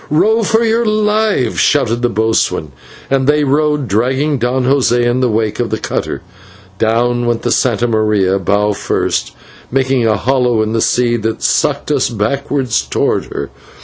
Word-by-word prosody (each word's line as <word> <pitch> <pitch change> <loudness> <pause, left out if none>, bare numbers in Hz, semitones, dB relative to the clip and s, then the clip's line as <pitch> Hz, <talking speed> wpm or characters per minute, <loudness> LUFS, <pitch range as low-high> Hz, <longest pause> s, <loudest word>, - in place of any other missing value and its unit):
"Row 220 +9 +2
for 225 +1 +1
your 230 +1 +1
lives," 215 - 0
shouted 120 -5 +1
the 120 - +1
boatswain, 110 -8 0 0.4
and 135 -1 +1
they 150 0 +3
rowed, 150 0 +1
dragging 130 +7 0
Don 125 +2 0
José 125 -2 +2
in 120 +1 +1
the 130 -1 +1
wake 110 -1 -1
of 120 - -1
the 110 - -2
cutter. - - -4 0.6
Down 120 +2 +1
went 120 -1 -1
the 120 - 0
/Santa 120 -2 +1
Maria/, 105 -4 +1
bow 100 +3 +1
first, - - -2 0.4
making 130 -2 +1
a 110 -2 +2
hollow 125 0 +1
in 110 +1 -3
the 115 - 0
sea 120 0 +1
that 110 0 -3
sucked - - 0
us - - +1
back 120 +5 -2
towards 130 -5 -1 0.4
her. - - -6
120 Hz, 165 wpm, -14 LUFS, 110-140 Hz, 0.6 s, they